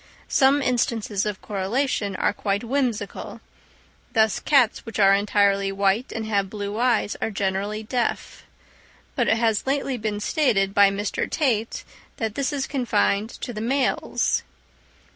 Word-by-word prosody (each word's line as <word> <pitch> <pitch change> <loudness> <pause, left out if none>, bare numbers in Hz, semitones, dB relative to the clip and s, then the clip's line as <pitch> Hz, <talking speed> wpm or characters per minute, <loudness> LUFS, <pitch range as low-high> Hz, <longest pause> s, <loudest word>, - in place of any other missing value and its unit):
Some 275 +1 +4
instances 225 -5 0
of 205 -2 -5
correlation 205 +1 -1
are - - +1
quite 200 0 -2
whimsical; 240 -5 -2 0.7
thus 220 -2 +3
cats 265 -6 +3
which 225 -3 -7
are 195 -2 +6
entirely 200 -1 +2
white 195 +5 0
and 225 -1 -4
have 200 -3 0
blue 205 +1 -4
eyes 240 -4 +1
are - - 0
generally 200 +1 -2
deaf; 240 +2 -2 0.7
but - - +1
it 225 - +3
has 225 -2 +1
been 275 +1 -1
lately 220 -6 -2
stated 205 -5 +1
by 200 -1 +6
Mr. 200 +1 -2
Tait 230 -8 0 0.3
that 220 -2 -2
this 280 +4 -1
is 280 -2 -2
confined 220 -5 0
to 245 - -7
the 215 - -5
males. 260 +3 0
215 Hz, 145 wpm, -24 LUFS, 200-245 Hz, 0.7 s, are